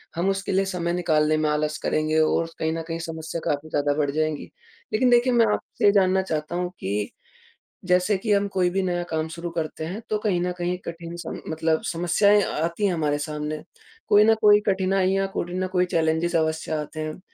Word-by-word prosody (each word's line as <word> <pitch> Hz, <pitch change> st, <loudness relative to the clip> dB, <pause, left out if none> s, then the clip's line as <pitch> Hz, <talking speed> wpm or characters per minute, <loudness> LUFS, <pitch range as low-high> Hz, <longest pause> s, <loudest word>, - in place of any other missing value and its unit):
हम 175 Hz, +3 st, 0 dB
उसके 195 Hz, 0 st, -2 dB
लिए 195 Hz, +1 st, +2 dB
समय 175 Hz, -3 st, -2 dB
निकालने 155 Hz, -3 st, +2 dB
में 155 Hz, -1 st, +1 dB
आलस 150 Hz, 0 st, 0 dB
करेंगे 155 Hz, +1 st, +1 dB
और 165 Hz, +1 st, +2 dB
कहीं 160 Hz, 0 st, 0 dB
न 165 Hz, -, -3 dB
कहीं 165 Hz, 0 st, -3 dB
समस्या 160 Hz, 0 st, -5 dB
काफ़ी 150 Hz, +2 st, -2 dB
ज़्यादा 145 Hz, -1 st, +1 dB
बढ़ 145 Hz, -2 st, +1 dB
जाएँगी। 155 Hz, 0 st, -1 dB, 0.5 s
लेकिन 250 Hz, +3 st, +3 dB
देखिए 245 Hz, +1 st, +4 dB
मैं 230 Hz, -1 st, +5 dB
आपसे -, -, -3 dB
ये 200 Hz, -, +7 dB
जानना 190 Hz, -1 st, +3 dB
चाहता 160 Hz, -2 st, -3 dB
हूँ 180 Hz, 0 st, -1 dB
कि 100 Hz, +2 st, -2 dB, 0.8 s
जैसे 180 Hz, +3 st, +3 dB
कि 210 Hz, +2 st, -2 dB
हम 200 Hz, 0 st, +2 dB
कोई 185 Hz, -2 st, +1 dB
भी 195 Hz, +2 st, 0 dB
नया 175 Hz, -1 st, -1 dB
काम 160 Hz, 0 st, -1 dB
शुरू 170 Hz, +2 st, -6 dB
करते 160 Hz, -1 st, -4 dB
हैं 195 Hz, +7 st, -5 dB
तो 215 Hz, -, +1 dB
कहीं 180 Hz, -3 st, +1 dB
न 180 Hz, 0 st, -1 dB
कहीं 175 Hz, +1 st, -1 dB
कठिन 170 Hz, 0 st, -7 dB
सम 160 Hz, -, -6 dB
मतलब 160 Hz, 0 st, 0 dB
समस्याएँ 200 Hz, +5 st, +3 dB
आती 170 Hz, +6 st, -1 dB
हैं 190 Hz, -, +2 dB
हमारे 150 Hz, -3 st, 0 dB
सामने, 150 Hz, 0 st, -4 dB, 0.5 s
कोई 205 Hz, +1 st, +6 dB
न 225 Hz, 0 st, +5 dB
कोई 210 Hz, -1 st, +7 dB
कठिनाइयाँ, 195 Hz, 0 st, +1 dB
कोई 175 Hz, +1 st, -3 dB
न 185 Hz, -, 0 dB
कोई 180 Hz, 0 st, +3 dB
चैलेंजेस 165 Hz, 0 st, 0 dB
अवश्य 160 Hz, 0 st, 0 dB
आते 155 Hz, 0 st, -3 dB
हैं। 155 Hz, +2 st, -4 dB
170 Hz, 205 wpm, -24 LUFS, 155-190 Hz, 0.8 s, ये